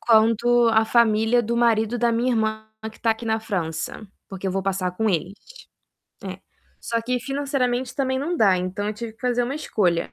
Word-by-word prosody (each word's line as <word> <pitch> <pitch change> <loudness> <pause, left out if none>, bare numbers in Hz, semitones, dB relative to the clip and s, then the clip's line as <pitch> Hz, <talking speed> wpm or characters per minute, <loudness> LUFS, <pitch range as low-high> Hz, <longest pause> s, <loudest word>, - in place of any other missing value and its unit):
quanto 230 +1 +4
a 220 0 +4
família 225 +1 +3
do 235 +2 -2
marido 230 0 +2
da 235 0 +2
minha 240 +2 +1
irmã 220 -1 -1 0.3
que - - -19
tá 230 - +2
aqui 225 +1 -2
na 220 0 0
França, 185 -1 -4 0.2
porque 195 0 -6
eu 185 - -1
vou 195 0 -1
passar 190 -2 -1
com 220 0 +1
eles, 185 +1 -1 0.9
é. - - -6 0.4
Só 230 0 -1
que 250 +1 -1
financeiramente, 260 -2 -1
também, 260 -1 0
não 335 +6 -2
dá, 195 - +4
então, 185 +3 -3
eu - - -1
tive 230 +1 -6
que 225 - -33
fazer 245 -1 +1
uma 255 +3 -3
escolha 185 - 0
225 Hz, 195 wpm, -23 LUFS, 210-245 Hz, 0.9 s, quanto